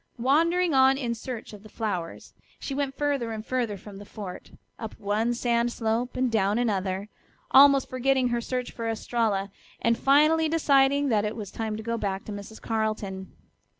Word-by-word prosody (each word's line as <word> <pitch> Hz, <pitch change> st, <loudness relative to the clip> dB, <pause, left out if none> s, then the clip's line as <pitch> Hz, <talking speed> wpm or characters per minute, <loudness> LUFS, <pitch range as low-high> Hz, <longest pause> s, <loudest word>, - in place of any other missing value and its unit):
Wandering 330 Hz, +7 st, +2 dB
on 265 Hz, 0 st, +5 dB
in 245 Hz, -4 st, -2 dB
search 230 Hz, -1 st, -7 dB
of 205 Hz, -, -11 dB
the 215 Hz, -, -14 dB
flowers, 190 Hz, -7 st, -4 dB, 0.3 s
she 275 Hz, -, -5 dB
went 275 Hz, -1 st, -2 dB
further 280 Hz, -6 st, 0 dB
and 215 Hz, 0 st, -6 dB
further 240 Hz, -5 st, -1 dB
from 200 Hz, +1 st, -11 dB
the 200 Hz, -, -9 dB
fort, 200 Hz, -3 st, -8 dB, 0.3 s
up 220 Hz, -1 st, -7 dB
one 220 Hz, +3 st, 0 dB
sand 235 Hz, 0 st, +1 dB
slope 235 Hz, +2 st, -2 dB
and 255 Hz, -1 st, +1 dB
clown 205 Hz, -1 st, +2 dB
another, 195 Hz, -4 st, -1 dB, 0.4 s
almost 275 Hz, 0 st, +7 dB
forgetting 255 Hz, 0 st, +1 dB
her 240 Hz, 0 st, 0 dB
search 250 Hz, +1 st, -3 dB
for 230 Hz, -1 st, -4 dB
Estralla, 215 Hz, -3 st, -1 dB, 0.3 s
and 230 Hz, 0 st, +2 dB
finally 305 Hz, +3 st, +4 dB
deciding 280 Hz, -3 st, +3 dB
that 215 Hz, -3 st, +2 dB
it 210 Hz, +1 st, -2 dB
was 210 Hz, -4 st, -7 dB
time 220 Hz, -1 st, -3 dB
to 220 Hz, -, -7 dB
go 230 Hz, 0 st, -2 dB
back 195 Hz, -1 st, -3 dB
to -, -, -7 dB
Mrs. 205 Hz, +2 st, -8 dB
Carleton. 215 Hz, -4 st, -3 dB
230 Hz, 180 wpm, -26 LUFS, 210-265 Hz, 0.4 s, almost